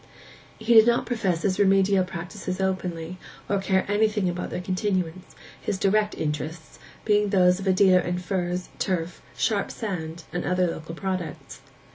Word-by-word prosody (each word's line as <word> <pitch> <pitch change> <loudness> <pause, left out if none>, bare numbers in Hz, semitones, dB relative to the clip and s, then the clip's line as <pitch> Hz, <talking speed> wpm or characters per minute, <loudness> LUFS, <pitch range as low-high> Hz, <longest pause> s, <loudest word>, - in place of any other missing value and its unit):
He 220 +2 +1
did 220 0 +8
not 235 0 +3
profess 190 -8 -1
his 190 -2 0
remedial 195 -1 +4
practices 180 +1 -6
openly, 185 -2 -2 0.3
or 200 - +1
care 190 -1 +1
anything 210 -1 +1
about 175 0 -3
their - - -4
continuance, 185 -2 -2 0.3
his 200 - -2
direct 210 +2 +2
interests 155 +1 -4 0.3
being 210 -1 +3
those 180 -2 +4
of 195 - -5
a - - +5
dealer 185 -1 +5
in 180 0 -2
furze, 180 -1 -2
turf, 175 -3 -2 0.2
'sharp 205 -3 0
sand,' 170 -6 -5
and 175 - -2
other 180 0 +1
local 165 -1 -5
products. 185 -4 -5
185 Hz, 155 wpm, -25 LUFS, 175-200 Hz, 0.3 s, did